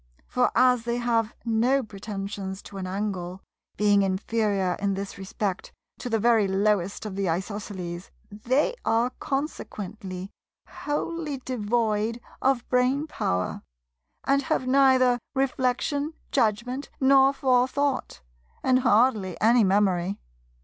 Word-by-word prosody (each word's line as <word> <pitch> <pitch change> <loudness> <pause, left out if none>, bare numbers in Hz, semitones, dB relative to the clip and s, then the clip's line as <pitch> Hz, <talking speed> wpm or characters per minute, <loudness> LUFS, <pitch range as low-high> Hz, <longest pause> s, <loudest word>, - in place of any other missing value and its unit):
For 250 0 +1
as 250 -1 +4
they 235 0 -1
have 230 -2 0
no 240 +4 +2
pretensions 195 -2 -6
to 200 - -10
an 185 - -4
angle, 190 -2 -4 0.3
being 205 -1 +4
inferior 195 -1 0
in 200 -1 0
this 200 0 -5
respect 195 0 -3 0.3
to 245 - -5
the 225 - +2
very 225 -2 +3
lowest 200 0 0
of 205 -3 -5
the 195 -2 -1
Isosceles, 185 -1 -4 0.2
they 250 - +1
are 230 +2 +2
consequently 205 - -5 0.4
wholly 300 0 -3
devoid 225 -1 0 0.2
of 260 -3 +1
brainpower, 250 - 0 0.6
and 275 0 +2
have 260 - -1
neither 255 -2 +4 0.2
reflection, 270 +3 0 0.2
judgment 245 +3 0
nor 270 0 +6
forethought, 260 - 0 0.4
and 255 -1 +4
hardly 220 -6 +2
any 230 +1 +5
memory. 190 -1 +2
225 Hz, 115 wpm, -26 LUFS, 195-255 Hz, 0.6 s, nor